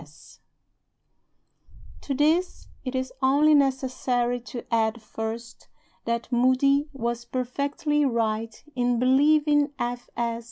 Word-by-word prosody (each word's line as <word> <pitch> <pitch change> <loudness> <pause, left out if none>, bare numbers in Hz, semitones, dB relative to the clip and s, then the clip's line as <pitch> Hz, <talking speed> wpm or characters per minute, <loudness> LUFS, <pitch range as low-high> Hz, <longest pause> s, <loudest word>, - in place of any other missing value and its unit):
F. - - -12
S." 150 +1 -18 1.6
To 275 - -3
this 320 +6 +1
it 255 0 -4
is 260 0 -2
only 285 +4 +4
necessary 255 -3 +1
to 240 0 -8
add 225 0 +1
(first) 225 +2 -7 0.4
that 235 +1 -2
Moody 260 +4 +3
was 235 -3 -3
perfectly 280 +4 -1
right 225 -3 -1
in 245 -1 +1
believing 290 +3 +3
F. 245 0 -4
S. 235 -1 -1
250 Hz, 115 wpm, -25 LUFS, 235-280 Hz, 1.6 s, only